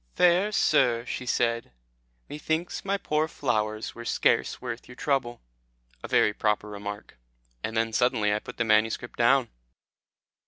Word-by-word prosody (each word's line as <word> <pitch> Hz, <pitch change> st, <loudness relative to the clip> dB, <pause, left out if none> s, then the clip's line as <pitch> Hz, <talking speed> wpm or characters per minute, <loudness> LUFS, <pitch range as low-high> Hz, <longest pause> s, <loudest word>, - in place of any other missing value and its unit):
'Fair 180 Hz, +4 st, +4 dB
sir,' 125 Hz, -, +2 dB
she 125 Hz, -, -5 dB
said, 115 Hz, -1 st, 0 dB, 0.6 s
'methinks 160 Hz, +3 st, -3 dB
my 200 Hz, 0 st, 0 dB
poor 155 Hz, -4 st, 0 dB
flowers 110 Hz, -6 st, -2 dB
were 120 Hz, -, -9 dB
scarce -, -, +1 dB
worth 120 Hz, -1 st, -6 dB
your 125 Hz, -, -12 dB
trouble.'" 125 Hz, -4 st, -1 dB, 0.6 s
A -, -, -6 dB
very 105 Hz, -, +3 dB
proper 105 Hz, 0 st, 0 dB
remark. 105 Hz, -8 st, -8 dB, 0.4 s
And 110 Hz, -, -3 dB
then 115 Hz, 0 st, 0 dB
suddenly 110 Hz, -4 st, +2 dB
I 105 Hz, -, 0 dB
put 125 Hz, -, -10 dB
the 120 Hz, -, +1 dB
manuscript 110 Hz, +2 st, +1 dB
down. 120 Hz, +1 st, +4 dB
120 Hz, 145 wpm, -27 LUFS, 110-135 Hz, 0.6 s, Fair